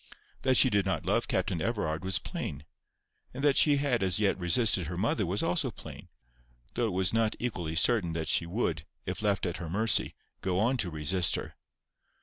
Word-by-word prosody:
That 130 -2 +3
she 130 - +7
did 100 -1 +2
not 95 -1 -2
love - - +1
Captain - - -1
Everard 80 +2 -2
was 95 -1 +1
plain, 70 -3 -6 0.7
and 135 - -5
that 145 -2 +4
she 145 -2 +4
had 135 -5 0
as 95 -2 +2
yet 105 -2 +2
resisted 95 - +2
her 85 +1 -5
mother 105 0 0
was 95 +4 0
also 85 - +1
plain, - - -11 0.6
though 120 - 0
it 105 - -3
was 95 +2 +1
not 115 -1 +1
equally 90 -10 -4
certain 90 -3 +2
that 80 -1 -3
she 85 - +2
would, 85 -5 -2 0.2
if - - -4
left 100 -3 0
at 85 - -2
her 85 -1 -6
mercy, 110 +6 +1 0.3
go 90 -1 -1
on 120 +6 +2
to 95 - -1
resist 80 +3 0
her. - - -6
95 Hz, 195 wpm, -29 LUFS, 85-115 Hz, 0.7 s, she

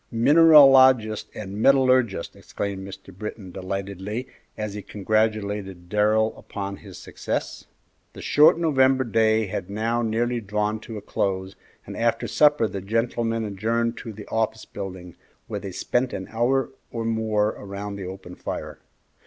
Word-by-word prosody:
"Mineralogist 130 -4 +6
and 105 0 -6
metallurgist!" 130 -8 +3
exclaimed 95 -1 -5
Mr. 95 -1 -11
Britton 100 -1 -7
delightedly, 100 +5 -5 0.3
as 105 -2 -4
he 105 - -6
congratulated 105 -3 -2
Darrell 110 +2 +2
upon 100 -1 -6
his - - -12
success. - - -5 0.5
The - - -10
short 150 +3 +5
November 135 -5 +3
day 110 -1 +2
had 95 -2 -5
now 115 +3 -1
nearly 120 +1 -1
drawn 105 +1 -1
to 110 - -5
a - - -7
close, 95 -2 -2 0.3
and - - -8
after 115 0 0
supper 150 -6 +3
the 100 -2 -6
gentlemen 115 +2 -1
adjourned 115 +3 -1
to 115 - -7
the 105 -1 -11
office 110 0 -1
building, 95 -3 -8 0.3
where 105 -2 -5
they 100 -1 -7
spent 125 +7 -1
an 95 - -6
hour 120 +3 +1 0.2
or 115 -1 -4
more 110 -2 +1
around 100 0 -6
the 95 -2 -6
open 95 -1 -9
fire. - - -6
110 Hz, 145 wpm, -24 LUFS, 100-115 Hz, 0.5 s, Mineralogist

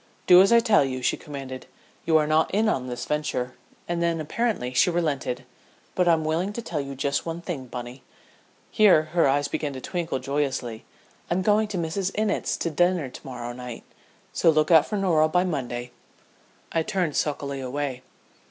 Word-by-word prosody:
"Do 180 0 +8
as 195 - +4
I 235 0 +7
tell 220 -8 +4
you," 130 -2 -3
she - - +2
commanded. 135 -3 -8 0.4
"You 160 -1 +5
are 155 - +2
not 155 +1 +2
in 215 +3 +1
on 130 -11 0
this 125 -1 -5
venture." 150 -4 -2 0.3
And 170 0 -2
then 170 -1 +1
apparently 155 - -2
she 130 - +4
relented. 150 -7 -1 0.5
"But 180 -1 +1
I'm 165 -2 +3
willing 170 +6 -1
to 235 - -4
tell 160 -7 -3
you 140 0 -6
just 140 +1 -1
one 165 0 -4
thing, 160 -7 -6
Bunny" 125 +2 -7 0.7
here 200 -7 +5
her 170 -4 +4
eyes 145 +1 +2
began 145 -1 -3
to 130 - -6
twinkle 170 0 -3
joyously 135 -5 -3 0.4
"I'm 180 +2 0
going 210 +2 +3
to 205 -3 -4
Mrs. 180 +3 -2
Innitt's 215 -1 0
to 170 - -2
dinner 175 -2 +1
to - - -11
morrow 120 -2 -6
night 125 -1 -8 0.5
so - - +3
look 155 +1 +3
out 160 -3 +6
for 210 - -2
Norah 165 -5 +3
by 180 +3 +2
Monday." 125 -8 -3 0.8
I 165 - +1
turned 180 -4 -1
sulkily 140 -2 -2
away. 130 0 -3
155 Hz, 185 wpm, -25 LUFS, 135-180 Hz, 0.8 s, Do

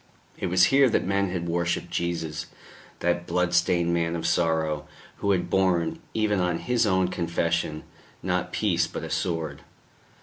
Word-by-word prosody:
It - - -3
was 90 +1 +4
here 135 -1 +6
that - - +1
men 100 0 +1
had 90 -1 -3
worshipped 85 0 -1
Jesus, 85 -3 -2 0.5
that 85 0 0
blood 90 0 0
stained 85 0 +2
Man 85 0 0
of 85 - -4
Sorrow, 80 -3 +1 0.3
who 100 - -2
had 90 -3 +2
borne, 90 -3 +1 0.2
even 105 -2 +1
on 90 -2 +1
His 120 +1 +1
own 95 -2 +3
confession, 85 -3 -1 0.4
not 90 0 -1
peace 85 -5 +1
but - - -6
a - - -6
sword. 80 -5 -2
85 Hz, 160 wpm, -26 LUFS, 85-95 Hz, 0.5 s, here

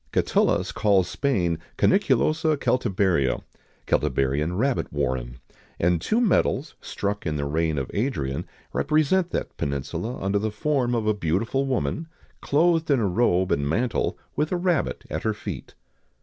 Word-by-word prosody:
[XIX - - 0
103] - - +7
Catullus - - +1
calls 95 -4 +2
Spain 90 - 0 0.2
Cuniculosa 160 -5 +2
Celtiberia 95 - +1 0.4
(Celtiberian 75 +6 0
rabbit 130 +4 0
warren); 60 -1 -2 0.4
and 85 -1 +2
two 220 - +1
medals, 175 - +1
struck 100 -2 -3
in 75 - -1
the 70 -1 -2
reign 80 +1 0
of 70 -2 -3
Adrian, 75 - -1 0.3
represent 155 +4 +2
that - - -3
peninsula 70 - -3
under 100 +1 0
the 110 +2 -1
form 125 +2 0
of 115 -2 -1
a 110 - +3
beautiful 105 - 0
woman, 130 - -1 0.3
clothed 165 +2 +2
in 140 -3 +4
a 110 - +1
robe 95 -2 +2
and 70 0 +1
mantle, 115 +9 0 0.2
with 150 +1 0
a 180 - +1
rabbit 175 -3 0
at 80 - -2
her 110 -1 -1
feet. - - -7
105 Hz, 150 wpm, -25 LUFS, -, 0.4 s, 103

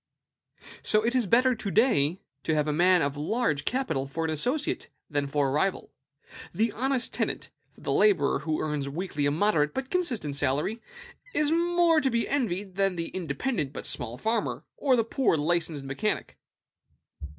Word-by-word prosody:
So 215 +1 +2
it 235 - +1
is 250 -5 +2
better 255 +6 +4
to 215 -3 -4
day 190 - +2 0.2
to 160 - 0
have 150 0 +1
a 150 - +1
man 180 +2 +4
of 140 0 -1
large 150 - 0
capital 160 - -1
for 165 +4 -3
an 160 - -1
associate 250 - -1 0.2
than 145 -1 0
for 140 0 +1
a - - -1
rival. 180 +7 0 0.6
The 225 +1 +2
honest 260 +3 -1
tenant - - -2 0.2
the - - -4
laborer 415 -3 +3
who 155 -1 -2
earns 150 -3 -2
weekly 150 -2 -2
a - - +3
moderate 155 -3 +2
but 265 0 -4
constant 245 - -1
salary 145 - -1 0.5
is 300 0 +2
more 340 -1 +3
to 270 - +2
be 235 -2 0
envied 200 -8 -2
than 195 -2 +2
the 165 -1 -3
independent 165 - -2
but - - -6
small 120 0 -4
farmer, 225 - -1
or 270 -3 +3
the 230 - +2
poor 230 - +1
licensed 160 -1 0
mechanic. 140 +11 -2
185 Hz, 170 wpm, -27 LUFS, 150-245 Hz, 0.6 s, better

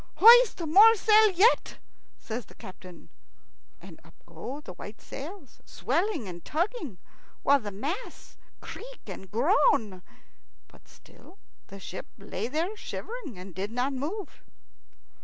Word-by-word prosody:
"Hoist 470 +1 +7
more 415 +8 +7
sail 435 +1 +5
yet," 395 +6 +3 0.4
says 225 -1 -6
the - - -17
captain; 185 -1 -13 0.7
and - - -14
up - - -19
go 275 +3 -8
the 185 - -10
white 205 +4 -10
sails, 300 - -10
swelling 320 - -2
and 175 -2 -9
tugging, 325 - -3 0.5
while 280 0 +5
the 210 -5 -6
masts 290 - -6 0.3
creak - - -10
and 190 - -9
groan. 225 - +2 0.7
But - - -21
still 380 - -19 0.3
the 200 - -11
ship 185 0 -8
lay 200 +1 -5
there 325 - -2
shivering 435 - -7
and 185 0 -10
did 195 +3 -4
not 250 +4 -1
move. 320 +9 -5
285 Hz, 130 wpm, -28 LUFS, -, 0.7 s, Hoist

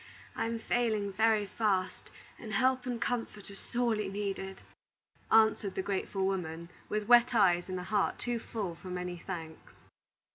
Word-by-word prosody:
I - - -1
am 230 0 -2
failing 220 -4 0
very 220 0 +3
fast, 195 -3 -1 0.3
and 220 -2 -7
help 255 +3 +2
and 245 -2 -2
comfort 230 -4 -3
are - - -9
sorely 220 -2 -1
needed," 195 -1 -4 0.7
answered 220 -3 +4
the 190 - -1
grateful 195 0 -1
woman, 170 -3 -3 0.2
with 210 -1 -1
wet 240 0 +6
eyes 180 -4 +4
and 185 0 -2
a - - -5
heart 210 +3 +1
too 240 -1 -2
full 210 -6 -4
for 175 +3 -12
many 180 -1 -4
thanks. 165 -3 -7
205 Hz, 155 wpm, -31 LUFS, 185-225 Hz, 0.7 s, wet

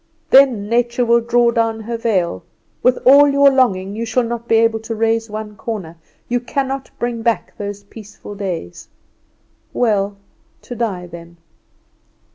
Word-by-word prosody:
Then 255 -7 +5
Nature 240 +2 +1
will 235 0 +3
draw 235 0 +2
down 225 -1 0
her 230 +2 -5
veil; 190 - -1 0.4
with 250 0 +3
all 280 +3 +8
your 280 0 +5
longing 200 -7 +1
you 225 - -3
shall 240 +2 0
not 235 0 -5
be 225 - +3
able 225 0 +3
to 225 +1 -6
raise 225 0 0
one 210 0 -7
corner; 205 -9 -6 0.3
you 245 0 0
cannot 270 +2 -3
bring 240 -1 -3
back 230 -1 -1
those 205 0 -6
peaceful 210 0 -12
days. 180 - -6 0.9
Well 205 -4 0 0.5
to 245 - -8
die 200 -7 -3
then! 170 0 -12
225 Hz, 150 wpm, -18 LUFS, 205-240 Hz, 0.9 s, all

